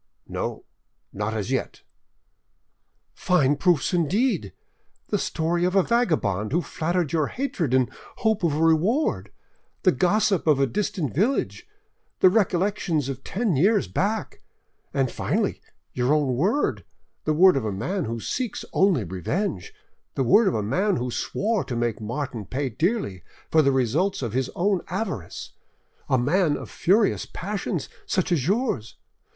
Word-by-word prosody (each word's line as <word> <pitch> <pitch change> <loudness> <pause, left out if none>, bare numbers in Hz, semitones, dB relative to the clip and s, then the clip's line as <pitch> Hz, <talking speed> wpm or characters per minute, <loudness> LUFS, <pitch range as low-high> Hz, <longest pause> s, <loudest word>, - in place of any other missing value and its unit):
"No, - - -4 0.5
not 105 +2 -2
as 110 +3 -3
yet." 130 - -3 1.3
"Fine 145 -6 +2
proofs 175 -3 +2
indeed! 180 - +1 0.6
The - - +1
story 170 +2 -1
of 180 +2 +1
a 195 - +5
vagabond 155 - +1
who 170 +4 +1
flattered 170 -1 -1
your 155 -3 +2
hatred 220 - -2
in 130 -1 +3 0.3
hope 220 -3 +1
of 160 -4 +2
a 160 - +1
reward, 165 - +2 0.5
the - - +5
gossip 195 - +1
of 150 -3 +4
a 135 - +4
distant 155 - -2
village, 220 - 0 0.5
the 185 - +6
recollections 185 - +1
of 135 0 -6
ten 205 -3 -1
years 200 +9 +3
back, 215 +3 -2 0.5
and 135 -3 0
finally, - - -1 0.3
your 125 +4 +2
own 145 -4 +1
word, 200 - +1 0.4
the 155 - +2
word 185 +4 +6
of 135 - 0
a 110 - -2
man 165 - -2
who 115 +1 -3
seeks 245 - -3
only 185 - +3
revenge, 95 - -3 0.4
the 135 - +1
word 205 - +5
of 190 - +1
a 105 - -1
man 185 - +1
who 125 -4 -2
swore 210 - -1
to 125 - -4
make 120 -2 -1
Martin 120 +1 -4
pay 135 +4 -2
dearly 155 - -1 0.3
for 160 - +6
the 140 -2 +3
results 135 - +1
of 115 -3 -3
his 130 0 0
own 190 0 +1
avarice, 185 - -4 0.6
a 130 - +3
man 150 +5 +2
of - - -9
furious 205 +4 +2
passions 190 -4 -4 0.2
such 185 -2 0
as 150 -5 +1
yours! 200 - -1
165 Hz, 150 wpm, -24 LUFS, 130-195 Hz, 1.3 s, the